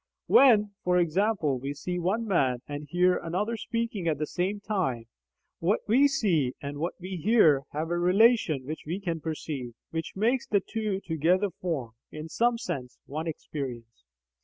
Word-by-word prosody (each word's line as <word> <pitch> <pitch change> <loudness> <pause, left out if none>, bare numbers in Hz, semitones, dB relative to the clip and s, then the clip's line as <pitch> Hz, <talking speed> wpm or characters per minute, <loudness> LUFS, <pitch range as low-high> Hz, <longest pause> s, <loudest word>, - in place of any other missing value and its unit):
When 215 -6 +6
(for 180 0 +2
example) 175 - +1
we 140 +3 -4
see 180 +5 -3
one 200 +7 0
man 130 - +1
and 145 0 -6
hear 180 +2 +3
another 200 +7 -2
speaking 230 -5 -3
at 155 -3 +1
the 150 - -1
same 190 +6 -2
time, 180 - -2 0.5
what 185 +6 +1
we 260 +7 +5
see 175 - +1
and 145 0 -6
what 170 +3 -2
we 185 +1 -5
hear 165 - +4
have 155 +3 -3
a 175 - +1
relation 180 - +3
which 155 +3 -5
we 175 +5 -2
can 170 -5 -3
perceive, 145 -6 -5 0.2
which 160 0 -4
makes 235 +6 +1
the 205 - +3
two 210 -1 -3
together 180 +3 +1
form, 155 -10 -4 0.2
in 155 +1 -7
some 235 +6 +2
sense, 135 - -5
one 155 +4 -4
experience. 125 - -6
175 Hz, 165 wpm, -28 LUFS, 150-205 Hz, 0.5 s, When